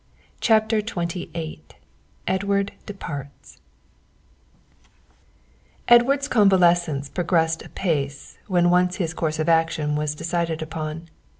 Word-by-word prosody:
CHAPTER 220 -1 +3
XXVIII 170 - -4 0.7
EDWARD 200 +1 0 0.2
DEPARTS 145 -8 -8 2.3
Edward's 270 +4 +5
convalescence 175 - +3
progressed 165 -1 0
apace 145 -6 -3
when 175 -3 +3
once 180 0 +3
his 165 -4 -2
course 155 -1 -2
of 155 +1 -1
action 165 -2 +2
was 150 0 -1
decided 165 0 -2
upon. 160 +1 -6
170 Hz, 90 wpm, -23 LUFS, 155-195 Hz, 2.3 s, Edward's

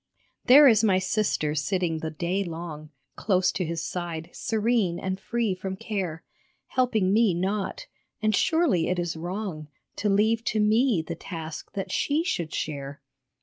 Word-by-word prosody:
There 285 +3 +9
is 225 -3 +5
my 195 -4 +4
sister 185 -5 0
sitting 160 +2 -1
the 160 - -3
day 175 +5 -1
long 165 -3 -7 0.3
Close 185 -3 +2
to 185 - -2
His 165 0 -3
side, 170 -2 -5
serene 220 -5 0
and 190 +1 -3
free 225 0 -1
from 190 +1 -5
care, 190 -5 -4 0.5
Helping 220 -7 +1
me 215 -5 +4
not; 195 +3 -2 0.3
and 215 -1 +2
surely 320 - +2
it 180 - 0
is 175 -1 -2
wrong 175 -2 -5 0.3
To 210 - 0
leave 220 +3 +2
to 215 - 0
me 215 -3 +3
the 170 - -3
task 165 -2 -7
that 195 - -4
she 300 +3 +1
should 170 - -2
share. 140 -2 -4
185 Hz, 155 wpm, -26 LUFS, 165-215 Hz, 0.5 s, There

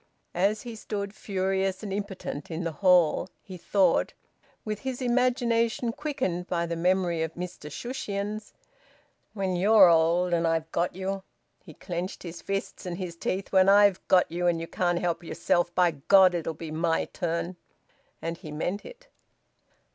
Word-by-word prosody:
As 200 +4 +1
he 235 -2 -7
stood 200 -2 -5
furious 190 -1 -1
and 200 -2 -4
impotent 195 -7 -5
in 165 +1 -4
the 165 - -2
hall, 180 0 +3
he 190 - -9
thought, 185 0 +2 0.5
with 215 -1 -3
his 260 -2 -4
imagination 240 -2 +1
quickened 190 - -3
by 170 -1 0
the 170 0 -3
memory 175 -1 +1
of 160 0 -3
Mr 175 -4 -7
Shushions: 210 - -4 0.8
"When 190 -3 -1
you're 195 +1 +7
old, 170 +2 +3
and 170 -1 +2
I've 165 0 -1
got 175 +1 -1
you" 190 +1 -3 0.4
he - - -13
clenched 180 0 -5
his 170 -1 -8
fists 195 -1 -4
and 175 -1 -4
his 180 -3 -5
teeth 190 +3 -3
"when 190 0 +5
I've 200 -1 +5
got 185 -1 +5
you 175 +1 0
and 170 -1 +2
you 165 - -4
can't 175 +1 0
help 175 -1 -1
yourself, 175 +1 0
by 180 -2 +4
God 185 +5 +5
it'll 165 -2 -3
be 160 0 -7
my 165 +1 0
turn!" 170 +1 -3 0.7
And 165 0 -3
he 155 - -9
meant 175 +7 -3
it. - - -13
185 Hz, 160 wpm, -27 LUFS, 170-200 Hz, 0.8 s, you're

